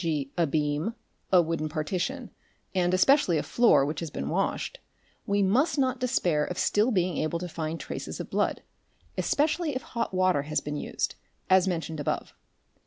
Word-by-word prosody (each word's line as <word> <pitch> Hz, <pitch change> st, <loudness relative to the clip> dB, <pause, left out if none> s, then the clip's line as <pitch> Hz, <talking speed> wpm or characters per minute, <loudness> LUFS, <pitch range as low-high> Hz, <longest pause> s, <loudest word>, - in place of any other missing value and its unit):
g., 150 Hz, -5 st, -1 dB
a 170 Hz, -2 st, +2 dB
beam, 150 Hz, +8 st, -1 dB, 0.4 s
a 180 Hz, -2 st, +6 dB
wooden 160 Hz, -1 st, -2 dB
partition, 185 Hz, -, -3 dB, 0.4 s
and 180 Hz, -2 st, +2 dB
especially 185 Hz, -, +4 dB
a -, -, 0 dB
floor, 235 Hz, -, +4 dB
which 150 Hz, +1 st, -3 dB
has 165 Hz, -, -4 dB
been 70 Hz, -, -4 dB
washed, -, -, -1 dB, 0.5 s
we 200 Hz, 0 st, +2 dB
must 250 Hz, -, +2 dB
not 260 Hz, -2 st, +1 dB
despair 180 Hz, -, +1 dB
of 180 Hz, +4 st, -4 dB
still 205 Hz, +4 st, +2 dB
being 180 Hz, -, +1 dB
able 155 Hz, +2 st, 0 dB
to 180 Hz, +1 st, -5 dB
find 160 Hz, -1 st, -4 dB
traces -, -, -6 dB
of -, -, -4 dB
blood, -, -, -1 dB, 0.5 s
especially 310 Hz, 0 st, +1 dB
if 255 Hz, -, -3 dB
hot 235 Hz, -1 st, -3 dB
water 185 Hz, -5 st, +2 dB
has 150 Hz, +2 st, -1 dB
been 150 Hz, 0 st, -5 dB
used, -, -, -2 dB, 0.4 s
as 190 Hz, 0 st, +6 dB
mentioned 165 Hz, -3 st, -2 dB
above. 145 Hz, -, -2 dB
180 Hz, 175 wpm, -27 LUFS, 155-230 Hz, 0.5 s, a